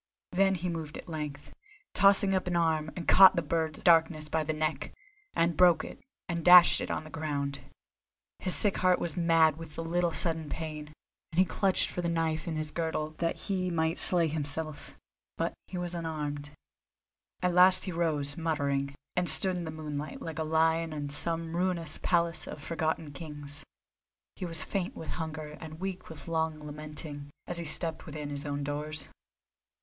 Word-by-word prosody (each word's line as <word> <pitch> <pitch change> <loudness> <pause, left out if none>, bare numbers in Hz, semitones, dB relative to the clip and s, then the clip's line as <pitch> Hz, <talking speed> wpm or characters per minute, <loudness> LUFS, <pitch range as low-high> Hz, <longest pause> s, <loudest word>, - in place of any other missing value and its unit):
Then 195 +1 +3
he 180 0 -3
moved 160 -3 -4
at - - -10
length, 150 -3 -6 0.4
tossed 195 +1 +6
up 190 -2 +1
an 175 - -1
arm, 160 -2 +1
and 175 - -6
caught 190 0 +8
the 170 - 0
bird 160 0 -1
of - - -14
darkness 160 -2 +4
by 160 0 0
the 155 - -1
neck, 155 0 -2 0.4
and 170 0 +2
broke 180 -2 +5
it, - - -9 0.3
and 170 -2 -3
dashed 180 0 +8
it - - -4
on - - -2
the 155 - -12
ground. 140 -3 -3 0.8
His 185 - +3
sick 205 -2 +4
heart 185 -1 +3
was 170 -4 -2
mad 165 -3 +4
with 160 -2 -10
the 165 - -4
little 175 +1 0
sudden 160 -2 0
pain, 155 -2 -5 0.4
and 160 - -8
he 185 - +6
clutched 190 +2 +1
for 180 - -3
the 170 - -1
knife 160 -1 -1
in 165 - -2
his 155 -1 -1
girdle 160 -2 -2
that 170 -1 0
he 185 -3 -1
might 160 -1 0
slay 175 -3 +3
himself, 155 0 -5 0.4
but - - -1
he 185 - -6
was 175 0 -2
unarmed. 150 -3 -4 0.9
At 180 -1 +2
last 185 +1 +6
he 190 - -4
rose, 155 -4 -1
muttering, 140 -4 -1 0.2
and 180 -1 +3
stood 190 -1 +5
in 175 -1 -4
the - - -5
moonlight, 150 -2 -5
like 165 -1 -6
a - - 0
lion 160 +1 +1
in 145 -1 -4
some 165 +3 -1
ruinous 175 -3 0
palace 170 -2 +1
of - - -7
forgotten 160 0 -2
kings. 145 -1 -7 0.7
He 185 - -5
was 165 -2 -2
faint 185 +1 -3
with 160 - -7
hunger 155 -1 -6
and 160 0 -9
weak 190 0 -5
with 160 0 -11
long 160 -1 0
lamenting, 150 -1 -7 0.2
as 175 -1 -3
he 170 - -4
stepped 160 +2 -2
within 150 -1 -6
his 145 +1 -5
own 145 0 -2
doors. 150 +1 -4
160 Hz, 185 wpm, -30 LUFS, 150-170 Hz, 0.9 s, caught